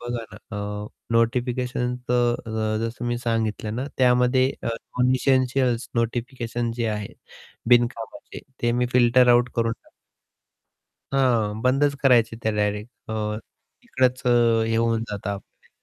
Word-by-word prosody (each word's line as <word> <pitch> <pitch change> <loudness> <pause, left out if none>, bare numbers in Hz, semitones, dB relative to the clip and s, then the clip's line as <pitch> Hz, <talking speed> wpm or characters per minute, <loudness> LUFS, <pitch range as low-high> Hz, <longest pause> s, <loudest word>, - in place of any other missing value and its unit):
बघा 120 -1 -4
ना - - -10 0.2
अ, 105 0 -4 0.3
नोटिफिकेशन 125 +1 0
तर 120 -1 +2
अ, 110 -1 -1
जसं 120 +1 -5
मी 120 0 -1
सांगितलं 110 -2 -2
ना 130 +3 -3
त्यामध्ये 125 +1 +4
अ, - - -4
नॉन 125 +2 -1
एसेंशियल्स 130 -2 +1
नोटिफिकेशन 120 0 -2
जे 115 -1 -1
आहे 105 -1 -3 0.6
बिनकामाचे 120 -2 +1 0.2
ते 120 0 +2
मी 125 0 +1
फिल्टर 125 0 +5
आउट 120 0 +5
करून 115 0 +1
टाक - - -24 1.2
हां, 115 -5 +2
बंदच 140 +3 +2
करायचे 115 -4 +4
त्या 110 - 0
डायरेक्ट 105 +2 -1 0.2
अ, 105 -1 -2 0.5
तिकडंच 130 0 0
हे 115 -2 +3
होऊन 115 0 +1
जाता 100 -1 -3
आपले. 100 0 -12
120 Hz, 135 wpm, -24 LUFS, 110-125 Hz, 1.2 s, फिल्टर